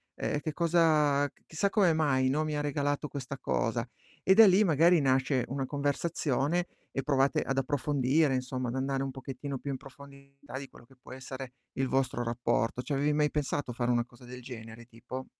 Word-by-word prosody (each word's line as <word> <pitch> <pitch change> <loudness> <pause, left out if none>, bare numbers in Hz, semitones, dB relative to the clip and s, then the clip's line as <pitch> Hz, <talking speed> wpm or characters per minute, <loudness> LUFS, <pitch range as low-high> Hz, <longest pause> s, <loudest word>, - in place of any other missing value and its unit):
uhm, 145 - -2
che 155 0 -4
cosa 155 -4 +3
c - - -32
chissà 195 +5 0
come 190 -6 +3
mai, 130 -4 +2
no, 150 +3 +1
mi 155 -1 -2
ha - - 0
regalato 145 0 -1
questa 140 -1 -6
cosa?" 115 -1 -1 0.4
E 190 - +5
da 220 0 +9
lì, 190 +3 +5
magari 165 -1 +4
nasce 130 -1 +2
una 135 0 -2
conversazione 145 +2 0 0.3
e 135 - -2
provate 140 -1 +2
ad 135 0 -2
approfondire 140 +1 +1
insomma, 130 0 -3
ad 125 - -4
andare 135 0 -1
un 135 - -3
pochettino 135 +1 -6
più 140 - -4
in 130 - -3
profondità 140 0 -12
di 140 - -8
quello 120 - -16
che 135 +1 -21
può - - -13
essere 130 -1 -8 0.2
il 135 0 -1
vostro 130 -2 0
rapporto. 120 0 0
Ci 145 - -4
avevi 145 +2 +1
mai 150 0 +2
pensato 145 -3 -2
a - - -6
fare 125 -1 0
una 120 0 +1
cosa 120 0 -17
del 125 +1 -9
genere 115 -1 -9
tipo? 125 +2 -8
135 Hz, 200 wpm, -30 LUFS, 130-150 Hz, 0.4 s, da